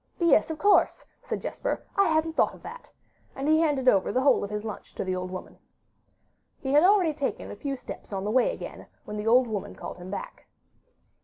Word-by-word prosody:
'Yes, 335 -2 +4
of 320 - -4
course,' 405 +6 +3 0.2
said - - -5
Jesper, - - -3
'I 395 0 +4
hadn't 320 0 +1
thought - - +2
of - - -18
that'; - - -10 0.5
and 270 +2 -3
he 315 +1 +5
handed 290 -5 +1
over 195 -6 +4
the 255 - +1
whole 280 - +4
of 200 - -4
his 210 0 -4
lunch 215 -2 -8
to - - -2
the 185 -1 -2
old 185 0 -4
woman. 185 0 -8 1.0
He 265 - -3
had 295 - +7
already 370 -4 +4
taken 285 -2 -3
a - - -7
few 275 +6 -3
steps 250 - -10
on 195 -1 -3
the 210 - -1
way 255 +1 +3
again, - - -8 0.2
when 210 - -6
the 210 +1 -4
old 250 +3 +6
woman 215 -4 -5
called - - -8
him 180 +1 -9
back. 200 - -7
265 Hz, 220 wpm, -27 LUFS, 210-315 Hz, 1.0 s, had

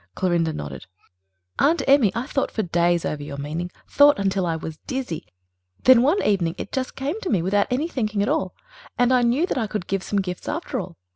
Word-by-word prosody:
Clorinda 175 -3 +1
nodded. 70 - -7 0.7
"Aunt 330 +4 +3
Emmy, 270 -7 +5
I 235 +2 -2
thought 275 -1 -1
for 220 - -2
days 175 -1 +1
over 150 - -3
your 145 -1 -7
meaning... 155 +5 -4 0.2
thought 290 0 +5
until 195 -2 0
I 165 - 0
was 160 -1 -7
dizzy. 260 - -4 0.5
And - - -34
then 255 -2 +8
one 305 +11 +2
evening 180 -5 +1
it - - -6
just 260 -1 -3
came 290 +11 -3
to 380 - -3
me, 185 -6 +1
without 200 +3 +2
any 270 +6 0
thinking 215 -9 -1
at - - -1
all, 305 +4 -1 0.4
and 245 0 +3
I 250 - +4
knew 245 +8 +2
that 275 - -2
I 225 - -1
could 210 -3 -4
give 195 0 -1
some 200 +1 -1
gifts 180 -2 -4
after 295 -4 -3
all. 180 -3 -7
205 Hz, 220 wpm, -23 LUFS, 175-265 Hz, 0.7 s, then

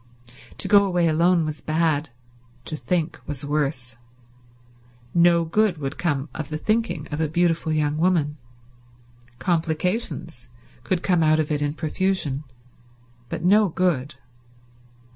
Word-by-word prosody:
To - - -2
go 200 -1 +6
away 175 -3 +1
alone 170 +1 +3
was 155 -1 -5
bad; 155 -1 0 0.6
to 155 - -4
think 170 +1 -2
was 145 -1 -4
worse. 135 -5 -1 1.2
No 170 -1 +4
good 185 0 +1
could 140 0 -5
come 145 -5 -1
out - - -3
of 145 - -9
the 155 - -3
thinking 215 -5 -1
of 150 +1 -2
a 160 - +1
beautiful 165 0 +1
young 150 -1 0
woman. 160 -4 +1 1.0
Complications 160 - -2 0.3
could 175 +8 -1
come 180 -3 +2
out 155 0 +4
of 155 0 -1
it 150 -1 0
in 145 0 -1
profusion, 155 -3 -1 0.8
but - - -4
no 205 +2 +5
good. 160 -6 0
160 Hz, 135 wpm, -23 LUFS, 150-175 Hz, 1.2 s, go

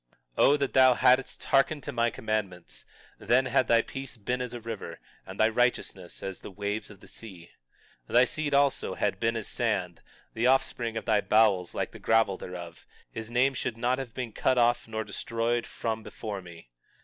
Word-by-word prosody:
20:18 - - +3
O 145 - +6
that 140 -2 -2
thou 130 -1 +6
hadst 130 +2 +3
hearkened 140 +1 +2
to 145 - -4
my 120 -2 +1
commandments—then 110 +4 -2
had 130 -2 +2
thy 115 0 +4
peace 135 -2 -8
been 125 +4 -2
as 125 -2 -4
a 120 - -6
river, 115 -2 -7 0.3
and 95 +1 -9
thy 110 - +6
righteousness 110 -6 -1
as 95 -1 -5
the - - -8
waves 100 +2 -4
of 100 -2 -14
the - - -15
sea. 90 -7 -11 0.6
20:19 - - -9
Thy 125 +1 +7
seed 150 +1 -3
also 140 0 +2
had - - -1
been 115 0 +1
as 110 - -4
the - - -5
sand; 95 -8 -1 0.3
the 115 +2 +1
offspring 120 -3 +1
of - - -5
thy 110 -3 +3
bowels 100 -6 +3
like - - -2
the - - -11
gravel 110 -3 +3
thereof; 85 -2 -9 0.2
his 115 0 -6
name 125 +3 +2
should 125 -2 -3
not 125 +2 0
have 125 -4 -7
been 125 -3 -4
cut 130 - +1
off 120 -1 +3
nor 110 -1 -3
destroyed 115 +3 -2
from 110 -1 -3
before 105 -2 -6
me. 85 -8 -14
115 Hz, 195 wpm, -28 LUFS, 105-125 Hz, 0.6 s, Thy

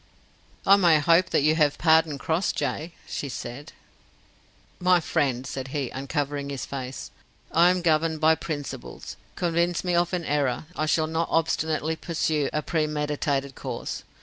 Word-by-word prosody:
"I 200 +1 +7
may 170 -5 +5
hope 170 +4 +4
that - - +2
you 155 +1 +4
have 150 -3 +2
pardoned 160 -3 +3
Crossjay?" 165 -1 -1
she 140 - -4
said. 125 +4 -7 1.1
"My 180 0 +4
friend," 135 -6 0
said 135 -1 -5
he, 135 -2 -3
uncovering 140 +1 -3
his 140 -2 -4
face, 130 -2 -6 0.4
"I 170 +2 +5
am 180 -1 +1
governed 160 -1 +2
by 160 +1 +5
principles. 145 -5 -6 0.2
Convince 170 0 0
me 180 -1 0
of 175 0 +2
an 180 -3 -2
error, 140 -2 0
I 155 - -1
shall 155 0 +2
not 160 +1 -1
obstinately 160 -1 0
pursue 155 -4 -1
a 150 - -1
premeditated 150 -3 -1
course. - - -5
155 Hz, 150 wpm, -25 LUFS, 140-165 Hz, 1.1 s, I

